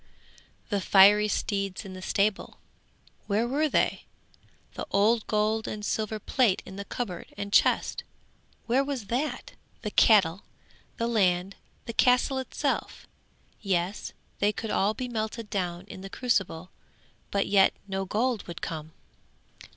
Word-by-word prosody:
'The 205 Hz, -2 st, 0 dB
fiery 205 Hz, +3 st, +6 dB
steeds 200 Hz, -1 st, -2 dB
in 190 Hz, -, -8 dB
the 185 Hz, -, -8 dB
stable, 200 Hz, +2 st, 0 dB, 0.7 s
where 215 Hz, +3 st, +1 dB
were 300 Hz, +5 st, +1 dB
they? -, -, +1 dB, 0.7 s
The -, -, -6 dB
old 215 Hz, +3 st, +2 dB
gold 215 Hz, +1 st, 0 dB
and 210 Hz, -1 st, -5 dB
silver 215 Hz, 0 st, -1 dB
plate 215 Hz, -1 st, +1 dB
in 190 Hz, -, -10 dB
cupboard 195 Hz, -8 st, -5 dB
and 200 Hz, 0 st, -5 dB
chest, -, -, +3 dB, 0.6 s
where 255 Hz, +4 st, +2 dB
was 275 Hz, -6 st, -4 dB
that? 290 Hz, +5 st, -2 dB, 0.3 s
The 210 Hz, -, -3 dB
cattle, 195 Hz, -5 st, +4 dB, 0.6 s
the 230 Hz, -, -1 dB
land, 195 Hz, -4 st, +1 dB, 0.3 s
the 230 Hz, -, -5 dB
castle 250 Hz, +3 st, +3 dB
itself? 260 Hz, -, -3 dB, 0.6 s
Yes, 190 Hz, -1 st, -1 dB, 0.3 s
they 205 Hz, +1 st, +3 dB
could 220 Hz, +1 st, -5 dB
all 205 Hz, +3 st, +1 dB
be 255 Hz, -, -4 dB
melted 220 Hz, -1 st, -4 dB
down 180 Hz, -2 st, -2 dB
in 190 Hz, -, -10 dB
the 195 Hz, -, -8 dB
crucible, 195 Hz, -8 st, -1 dB, 0.6 s
but 200 Hz, 0 st, 0 dB
yet 195 Hz, -1 st, +5 dB, 0.2 s
no 195 Hz, 0 st, -2 dB
gold 220 Hz, +3 st, -1 dB
would 170 Hz, -1 st, -8 dB
come. 155 Hz, -1 st, -5 dB
210 Hz, 135 wpm, -27 LUFS, 190-230 Hz, 0.7 s, fiery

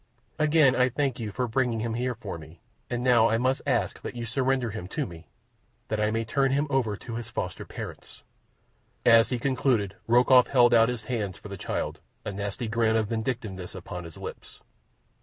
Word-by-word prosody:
"Again 150 Hz, -3 st, +5 dB
I 125 Hz, 0 st, +3 dB
thank 135 Hz, 0 st, -1 dB
you 110 Hz, -2 st, -3 dB
for 125 Hz, +4 st, -2 dB
bringing 120 Hz, -1 st, 0 dB
him 115 Hz, 0 st, -2 dB
here 125 Hz, +1 st, -1 dB
for 105 Hz, -7 st, -6 dB
me, 80 Hz, +1 st, -13 dB, 0.3 s
and 120 Hz, 0 st, -2 dB
now 120 Hz, -3 st, +5 dB
I 115 Hz, -, +2 dB
must 130 Hz, +3 st, +1 dB
ask 115 Hz, -8 st, 0 dB
you -, -, -4 dB
to 120 Hz, -1 st, -5 dB
surrender 130 Hz, 0 st, 0 dB
him 100 Hz, -4 st, -6 dB
to -, -, -2 dB
me, 85 Hz, -2 st, -11 dB, 0.6 s
that 110 Hz, -, -1 dB
I 105 Hz, 0 st, +2 dB
may 115 Hz, +1 st, -1 dB
turn 135 Hz, +5 st, +2 dB
him 140 Hz, +2 st, +2 dB
over 115 Hz, -7 st, +1 dB
to 115 Hz, +1 st, -6 dB
his 120 Hz, -, -6 dB
foster -, -, -4 dB
parents." -, -, -9 dB, 0.8 s
As 115 Hz, -1 st, +6 dB
he 125 Hz, -, 0 dB
concluded 120 Hz, -5 st, +1 dB
Rokoff 125 Hz, +2 st, +6 dB
held 120 Hz, -3 st, +5 dB
out 115 Hz, 0 st, +6 dB
his 120 Hz, -3 st, -4 dB
hands 105 Hz, -8 st, -3 dB
for 105 Hz, -, -11 dB
the 100 Hz, -, -5 dB
child, -, -, -3 dB, 0.3 s
a -, -, -2 dB
nasty 100 Hz, +4 st, -4 dB
grin 110 Hz, 0 st, +2 dB
of 110 Hz, -2 st, +1 dB
vindictiveness 110 Hz, -6 st, -3 dB
upon 90 Hz, -1 st, -7 dB
his 80 Hz, -, -10 dB
lips. -, -, -9 dB
115 Hz, 195 wpm, -27 LUFS, 105-125 Hz, 0.8 s, As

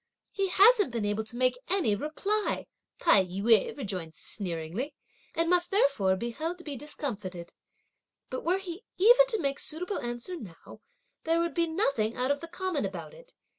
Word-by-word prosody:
"He 390 Hz, -1 st, 0 dB
hasn't 410 Hz, -, +6 dB
been 230 Hz, -3 st, -2 dB
able 205 Hz, +1 st, 0 dB
to 230 Hz, -, -9 dB
make 255 Hz, 0 st, +1 dB
any 360 Hz, -, +2 dB
reply," 390 Hz, -, -1 dB, 0.3 s
Tai 205 Hz, -, +5 dB
yü 200 Hz, +7 st, +3 dB
rejoined 185 Hz, -, -5 dB
sneeringly, 185 Hz, -, -4 dB, 0.4 s
"and 330 Hz, 0 st, +1 dB
must 350 Hz, 0 st, +3 dB
therefore 275 Hz, -, +3 dB
be 235 Hz, +5 st, -3 dB
held 325 Hz, +8 st, -4 dB
to 350 Hz, -, -13 dB
be 295 Hz, -4 st, -5 dB
discomfited; 210 Hz, -, -6 dB, 0.8 s
but 255 Hz, -, -4 dB
were 355 Hz, +4 st, +2 dB
he 380 Hz, +1 st, -7 dB
even 485 Hz, +6 st, +7 dB
to 445 Hz, -, +1 dB
make 275 Hz, -4 st, -1 dB
suitable 355 Hz, +6 st, -1 dB
answer 240 Hz, +9 st, -4 dB
now, 190 Hz, -, -11 dB, 0.4 s
there 330 Hz, +1 st, +2 dB
would 335 Hz, 0 st, 0 dB
be 335 Hz, -1 st, +1 dB
nothing 275 Hz, -, 0 dB
out 255 Hz, +2 st, +1 dB
of 285 Hz, -, 0 dB
the 335 Hz, -, -6 dB
common 355 Hz, -3 st, -2 dB
about -, -, -5 dB
it! -, -, -17 dB
290 Hz, 170 wpm, -29 LUFS, 220-360 Hz, 0.8 s, even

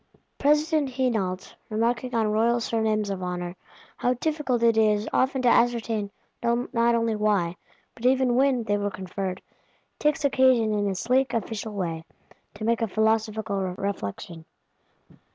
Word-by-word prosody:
President 300 Hz, 0 st, +2 dB
Hénault, 220 Hz, -8 st, -2 dB, 0.2 s
remarking 235 Hz, +3 st, -1 dB
on 225 Hz, -1 st, +2 dB
royal 230 Hz, +3 st, +2 dB
Surnames 220 Hz, -3 st, 0 dB
of 190 Hz, -1 st, -4 dB
Honour 180 Hz, 0 st, -4 dB, 0.4 s
how 250 Hz, +1 st, +1 dB
difficult 280 Hz, -4 st, -1 dB
it 230 Hz, -1 st, +4 dB, 0.4 s
often 260 Hz, 0 st, +1 dB
is -, -, -8 dB
to -, -, +3 dB
ascertain 235 Hz, -3 st, +2 dB, 0.3 s
not 235 Hz, 0 st, +1 dB
only 230 Hz, -1 st, +1 dB
why, 205 Hz, -5 st, +1 dB, 0.4 s
but 240 Hz, +1 st, -1 dB
even 260 Hz, -1 st, +3 dB
when, 260 Hz, -1 st, +2 dB
they 205 Hz, -1 st, 0 dB
were 205 Hz, 0 st, -1 dB
conferred, 190 Hz, 0 st, -5 dB, 0.6 s
takes 300 Hz, 0 st, +1 dB
occasion 260 Hz, -5 st, +3 dB
in 205 Hz, -1 st, 0 dB
his 190 Hz, -2 st, -2 dB
sleek 255 Hz, +1 st, +1 dB
official 220 Hz, -1 st, -3 dB
way, 165 Hz, -5 st, -3 dB, 0.5 s
to 215 Hz, -, -5 dB
make 230 Hz, 0 st, +1 dB
a 225 Hz, -, +1 dB
philosophical 220 Hz, -1 st, 0 dB, 0.2 s
reflection. 170 Hz, -, -5 dB
225 Hz, 140 wpm, -25 LUFS, 205-250 Hz, 0.6 s, it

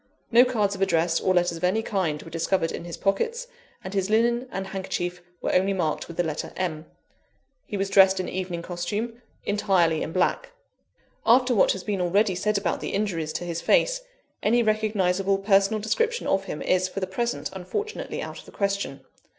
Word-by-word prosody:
No 240 Hz, +1 st, +8 dB
cards 215 Hz, -6 st, +1 dB
of 195 Hz, -, -7 dB
address 170 Hz, -2 st, +2 dB
or 185 Hz, -, +2 dB
letters 175 Hz, -1 st, +2 dB
of 165 Hz, -, -11 dB
any 200 Hz, +5 st, +2 dB
kind 175 Hz, -9 st, -1 dB
were 165 Hz, -, -11 dB
discovered 165 Hz, +1 st, 0 dB
in -, -, -6 dB
his 170 Hz, -, -6 dB
pockets, 460 Hz, -, 0 dB, 0.4 s
and 185 Hz, -, -6 dB
his 195 Hz, -1 st, 0 dB
linen 235 Hz, +3 st, +2 dB
and 195 Hz, 0 st, -3 dB
handkerchief 180 Hz, -2 st, -4 dB, 0.2 s
were -, -, 0 dB
only 190 Hz, +2 st, +3 dB
marked 165 Hz, -5 st, -1 dB
with 170 Hz, -, -10 dB
the 175 Hz, -, +2 dB
letter 155 Hz, -3 st, -4 dB
M. 160 Hz, -4 st, -3 dB, 0.8 s
He 205 Hz, -, -3 dB
was 195 Hz, 0 st, 0 dB
dressed 190 Hz, -1 st, +6 dB
in 185 Hz, -, -2 dB
evening 180 Hz, -2 st, -4 dB
costume 205 Hz, +8 st, -4 dB, 0.2 s
entirely 190 Hz, -6 st, +2 dB
in -, -, -3 dB
black. 185 Hz, -, 0 dB, 0.7 s
After 250 Hz, +2 st, +5 dB
what 215 Hz, -, +4 dB
has 190 Hz, -, -7 dB
been 200 Hz, -3 st, -1 dB
already 195 Hz, +3 st, +2 dB
said 205 Hz, +3 st, 0 dB
about 190 Hz, -4 st, -1 dB
the -, -, -3 dB
injuries 170 Hz, -7 st, -1 dB
to -, -, -3 dB
his 170 Hz, -1 st, -3 dB
face, -, -, +3 dB, 0.4 s
any 235 Hz, +3 st, +3 dB
recognisable 200 Hz, -3 st, +1 dB
personal 195 Hz, +1 st, +3 dB
description 455 Hz, -, 0 dB
of 195 Hz, 0 st, +1 dB
him 150 Hz, -, -5 dB
is, 185 Hz, 0 st, +2 dB
for 195 Hz, -, -4 dB
the 190 Hz, -, -1 dB
present, 235 Hz, +6 st, -2 dB
unfortunately 415 Hz, -, -4 dB
out -, -, -7 dB
of -, -, -13 dB
the -, -, -13 dB
question. 200 Hz, -8 st, -2 dB
195 Hz, 190 wpm, -25 LUFS, 175-215 Hz, 0.8 s, No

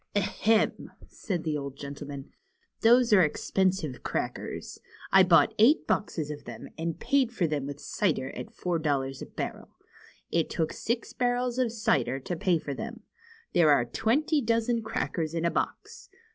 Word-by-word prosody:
^^Ahem!" 215 Hz, +2 st, +1 dB, 0.2 s
said 180 Hz, -7 st, -4 dB
the 155 Hz, -2 st, -1 dB
old 140 Hz, -2 st, -5 dB
gentleman. 140 Hz, -1 st, -7 dB, 0.5 s
Those 235 Hz, 0 st, +5 dB
are 195 Hz, -, +7 dB
ex 150 Hz, -4 st, -1 dB
pensive 185 Hz, -8 st, +1 dB
crackers. -, -, -4 dB, 0.3 s
I 190 Hz, -, +8 dB
bought 170 Hz, -5 st, +5 dB
eight 250 Hz, +9 st, +5 dB
boxes 155 Hz, -7 st, -1 dB
of 145 Hz, -3 st, -8 dB
them, 120 Hz, -2 st, -8 dB
and 165 Hz, 0 st, -3 dB
paid 270 Hz, -4 st, +2 dB
for 195 Hz, -7 st, 0 dB
them 150 Hz, -3 st, -2 dB
with 145 Hz, 0 st, -6 dB
cider 150 Hz, -10 st, -1 dB
at -, -, -7 dB
four 175 Hz, -2 st, -2 dB
dollars 135 Hz, -3 st, -1 dB
a -, -, -6 dB
barrel. -, -, -6 dB, 0.6 s
It 165 Hz, -1 st, +1 dB
took 160 Hz, -2 st, -1 dB
six 235 Hz, +1 st, -3 dB
barrels 245 Hz, 0 st, 0 dB
of 245 Hz, -3 st, +1 dB
cider 220 Hz, -, +1 dB
to 175 Hz, +7 st, -4 dB
pay 180 Hz, 0 st, +2 dB
for 145 Hz, -2 st, -5 dB
them. -, -, -6 dB, 0.5 s
There 170 Hz, -3 st, +5 dB
are 140 Hz, -5 st, +4 dB
twenty 250 Hz, -, +1 dB
dozen 230 Hz, 0 st, +1 dB
crackers 165 Hz, -6 st, -2 dB
in 165 Hz, 0 st, -1 dB
a 170 Hz, -, +2 dB
box. -, -, -4 dB
175 Hz, 165 wpm, -28 LUFS, 145-225 Hz, 0.6 s, I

